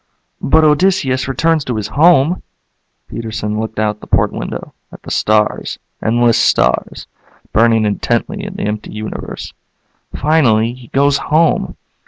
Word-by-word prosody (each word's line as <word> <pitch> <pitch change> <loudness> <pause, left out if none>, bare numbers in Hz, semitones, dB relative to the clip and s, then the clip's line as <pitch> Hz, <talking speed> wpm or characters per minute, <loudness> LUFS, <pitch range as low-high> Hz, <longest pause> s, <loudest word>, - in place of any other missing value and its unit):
"But 160 - +3
Odysseus 150 -5 +2
returns 160 +3 +1
to 125 - -2
his 105 -1 -3
home." 165 +1 +4 0.7
Peterson 110 -2 -4
looked 110 0 -5
out 105 0 -1
the - - -13
port - - +2
window, - - -6 0.2
at - - -13
the - - -8
stars, 105 0 0 0.2
endless 120 +1 +2
stars, 60 +1 +1 0.5
burning 115 -1 +3
intently 120 - -1
in 200 -1 -7
the 200 - -4
empty 105 0 -4
universe. 110 0 -7 0.6
"Finally 120 -7 +2
he 125 -1 -14
goes 140 +2 +2
home." 160 +1 +1
120 Hz, 135 wpm, -16 LUFS, 110-155 Hz, 0.7 s, home